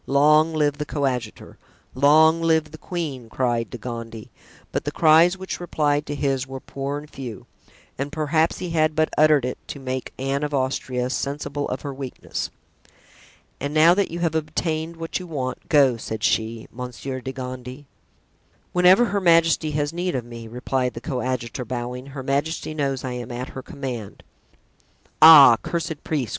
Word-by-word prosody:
"Long 150 +3 +4
live 145 -1 +1
the 150 - -2
coadjutor!" 130 -7 -3 0.3
"Long 155 +4 +5
live 160 -2 +2
the 155 - -11
queen!" 145 -10 -5
cried 120 -2 -1
De 125 - -7
Gondy; 115 -2 -7 0.4
but - - -2
the - - -3
cries 165 +3 +5
which 190 0 -5
replied 150 -4 0
to 145 - -3
his 135 -2 -1
were 135 0 -7
poor 140 +2 -5
and 150 +1 -9
few, 125 -8 -8 0.5
and 140 +1 -3
perhaps 155 +1 +1
he 180 -2 -5
had 155 -1 +2
but 155 0 +2
uttered 150 -3 +4
it 125 - -4
to 140 - -7
make 130 -1 -4
Anne 135 +2 -1
of 150 -1 -2
Austria 130 -1 -1
sensible 145 +1 -3
of 130 - -3
her 140 -2 -4
weakness. 135 -2 -5 1.1
"And 145 +2 -4
now 160 +3 +7
that 200 +1 +1
you 170 - -5
have 165 -2 +1
obtained 160 +1 -2
what 165 +2 -4
you 180 - -8
want, 130 -6 -5
go," 140 -6 +4
said 110 -1 -6
she, 110 0 0
"Monsieur 125 +1 -6
de 130 - -5
Gondy." 130 +1 -7 0.9
"Whenever 180 +6 +6
her 205 -3 -1
majesty 165 -2 +4
has 145 +1 -1
need 175 0 -2
of 125 -2 -3
me," 115 -1 -9
replied 125 +1 -2
the 115 - -6
coadjutor, 125 -2 -3
bowing, 125 +2 -5
"her 135 -1 -7
majesty 145 +4 -1
knows 140 -4 -2
I 130 - -3
am 125 0 -6
at 125 +2 -5
her 130 - -7
command." 125 -6 -7 1.0
"Ah, 150 -7 +10
cursed 165 -3 -4
priest!" 140 -8 -2
140 Hz, 170 wpm, -23 LUFS, 125-155 Hz, 1.1 s, Ah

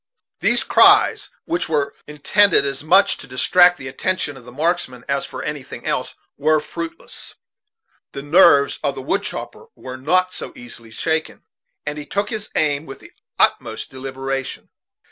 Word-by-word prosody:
These - - +3
cries, - - +5 0.2
which 335 - -2
were 150 -3 0
intended 150 +3 +3
as 135 0 -4
much 190 +5 +4
to 135 - -10
distract 175 +7 +4
the 130 - -8
attention 145 +2 -2
of 125 -3 -14
the 125 - -12
marksman 145 -4 -2
as 140 -1 -1
for - - -7
anything 145 -3 -6
else, - - -2 0.2
were 155 +2 +3
fruitless. 330 - -8 0.8
The 140 - -6
nerves 145 -2 +5
of 140 -2 -1
the 135 - -7
wood 195 +8 0
chopper 460 - -6
were 130 0 -8
not 185 +7 +1
so - - -7
easily 120 -2 -10
shaken, 160 +8 -3 0.4
and 150 0 -4
he 145 - -9
took 200 +1 -2
his 215 -1 -4
aim 150 0 0
with 135 - -8
the - - -16 0.3
utmost - - 0
deliberation. 135 0 -5
150 Hz, 160 wpm, -20 LUFS, 135-180 Hz, 0.8 s, cries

